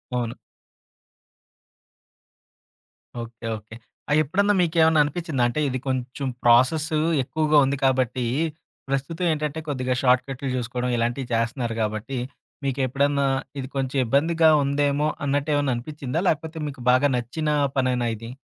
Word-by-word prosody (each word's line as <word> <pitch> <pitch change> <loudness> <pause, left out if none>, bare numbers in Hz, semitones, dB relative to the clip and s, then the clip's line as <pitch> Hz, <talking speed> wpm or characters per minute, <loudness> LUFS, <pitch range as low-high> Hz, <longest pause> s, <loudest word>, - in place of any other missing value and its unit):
అవును. 120 -1 -1 2.9
Okay. 115 0 -8
Okay. 110 +1 -13 0.3
ఆహ్, 150 - +3
ఎప్పుడన్నా 200 +8 +2
మీకేమన్నా 160 -2 +3
అనిపిచ్చిందా? 150 -3 -2
అంటే 120 +5 -2
ఇది 130 - -2
కొంచెం 130 +1 -2 0.2
ప్రాసెస్ 130 +7 +4 0.3
ఎక్కువగా 155 +2 +1
ఉంది 140 +1 -1
కాబట్టి 130 -1 +1 0.6
ప్రస్తుతం 140 +6 -2
ఏంటంటే 150 0 -2
కొద్దిగా 130 -3 -1
షార్ట్కట్లు 130 +1 +1
జూసుకోవడం 125 0 -2
ఇలాంటివి 120 +3 -1
చేస్తున్నారు 115 +1 -1
గాబట్టి 110 +5 -3 0.5
మీకెప్పుడన్నా 140 +1 +1 0.3
ఇది 130 - -4
కొంచెం 135 0 -1
ఇబ్బందిగా 160 +6 +3
ఉందేమో! 145 +1 +1 0.2
అన్నట్టేమన్నా 145 -1 +1
అనిపిచ్చిందా? 140 +3 -4
లేకపోతే 160 +1 -1
మీకు 140 -3 -8
బాగా 130 +3 +4
నచ్చిన 140 +6 -3 0.3
పనేనా 125 -2 +1
ఇది? 115 +2 -9
135 Hz, 115 wpm, -24 LUFS, 125-150 Hz, 2.9 s, ప్రాసెస్